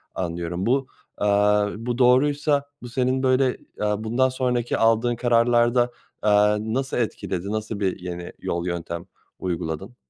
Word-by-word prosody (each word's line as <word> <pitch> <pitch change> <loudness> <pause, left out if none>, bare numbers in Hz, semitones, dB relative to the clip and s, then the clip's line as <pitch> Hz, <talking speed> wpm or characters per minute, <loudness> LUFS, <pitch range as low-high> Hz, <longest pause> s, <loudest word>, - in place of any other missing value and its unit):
anlıyorum. 85 +1 -3
Bu, 135 +2 +1 0.3
aaa, 105 0 +3
bu 120 +2 -3
doğruysa 140 +3 +3 0.2
bu 120 - -8
senin, 130 +2 0
böyle, 130 0 +2 0.2
aaa, 105 0 0
bundan 125 +4 +2
sonraki 125 -2 -1
aldığın 115 +2 +3
kararlarda, 120 0 +3 0.3
aaa, 105 0 +4
nasıl 125 +6 -2
etkiledi? 100 -4 -2
Nasıl 110 -1 -3
bir 95 -1 -1
yeni 90 -1 -6
yol, 85 0 -3
yöntem 85 0 -4 0.3
uyguladın? 85 +4 -4
115 Hz, 130 wpm, -24 LUFS, 100-125 Hz, 0.3 s, aaa